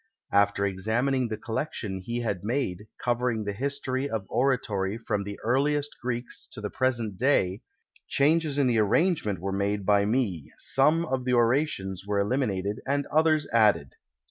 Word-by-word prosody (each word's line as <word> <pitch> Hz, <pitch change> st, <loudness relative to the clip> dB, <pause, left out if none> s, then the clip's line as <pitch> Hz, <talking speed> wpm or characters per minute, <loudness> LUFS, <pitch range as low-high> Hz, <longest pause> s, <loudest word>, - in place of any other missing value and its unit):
After 100 Hz, 0 st, +3 dB
examining 115 Hz, +7 st, 0 dB
the 110 Hz, -1 st, -4 dB
collection 110 Hz, -4 st, -4 dB
he 120 Hz, +6 st, -3 dB
had 100 Hz, -6 st, -2 dB
made, 105 Hz, -4 st, -2 dB
covering 120 Hz, -2 st, 0 dB
the 100 Hz, -1 st, -3 dB
history 135 Hz, +2 st, -2 dB
of 110 Hz, -5 st, -3 dB
oratory 110 Hz, -6 st, 0 dB
from 110 Hz, -3 st, -2 dB
the 100 Hz, 0 st, -7 dB
earliest 145 Hz, +4 st, +1 dB
Greeks 120 Hz, 0 st, -4 dB
to -, -, -7 dB
the 105 Hz, 0 st, -4 dB
present 120 Hz, -7 st, -1 dB
day, 110 Hz, -7 st, +2 dB, 0.5 s
changes 150 Hz, 0 st, +2 dB
in 140 Hz, -, +3 dB
the 120 Hz, -3 st, +2 dB
arrangement 110 Hz, -, +2 dB
were 95 Hz, +3 st, -3 dB
made 100 Hz, +1 st, -1 dB
by 100 Hz, 0 st, +4 dB
me, 105 Hz, -, -1 dB
some 155 Hz, +5 st, +3 dB
of 130 Hz, -5 st, -2 dB
the 125 Hz, 0 st, 0 dB
orations 115 Hz, -, +1 dB
were 105 Hz, -, -1 dB
PREFACE 100 Hz, -, +2 dB
eliminated 105 Hz, -5 st, -1 dB
and 140 Hz, +1 st, 0 dB
others 155 Hz, -1 st, +3 dB
added. 105 Hz, -, +3 dB
115 Hz, 160 wpm, -27 LUFS, 100-135 Hz, 0.5 s, by